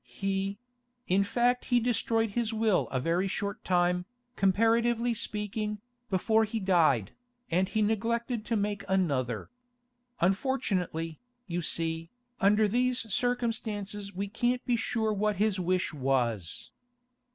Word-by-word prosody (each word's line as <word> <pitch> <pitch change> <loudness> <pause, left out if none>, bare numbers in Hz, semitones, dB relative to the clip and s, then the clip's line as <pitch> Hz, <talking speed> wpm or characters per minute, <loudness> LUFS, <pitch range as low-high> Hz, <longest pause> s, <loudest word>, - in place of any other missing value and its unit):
He—in 205 +2 -3
fact 245 +4 +1
he 245 -1 +3
destroyed 225 -2 +1
his 235 +1 0
will 220 -3 +2
a 130 - -1
very 170 +7 +1
short 200 +1 -3
time, 180 0 +2 0.3
comparatively 230 +4 +3
speaking, 210 -1 -3 0.3
before 220 +4 +3
he 220 +1 -2
died, 160 - +3 0.4
and 185 +3 +2
he 215 +2 +1
neglected 230 +2 0
to 230 - 0
make 205 -1 -1
another. 140 - 0 0.7
Unfortunately, 185 - 0 0.3
you 175 -2 -2
see, 165 0 -1 0.3
under 210 +2 +4
these 245 -1 0
circumstances 215 -5 -2
we 200 +1 -3
can't 245 +4 0
be 245 - +2
sure 225 -1 0
what 210 +1 +1
his 205 0 +1
wish 185 -1 0
was. 125 - -1
205 Hz, 120 wpm, -29 LUFS, 180-230 Hz, 0.7 s, under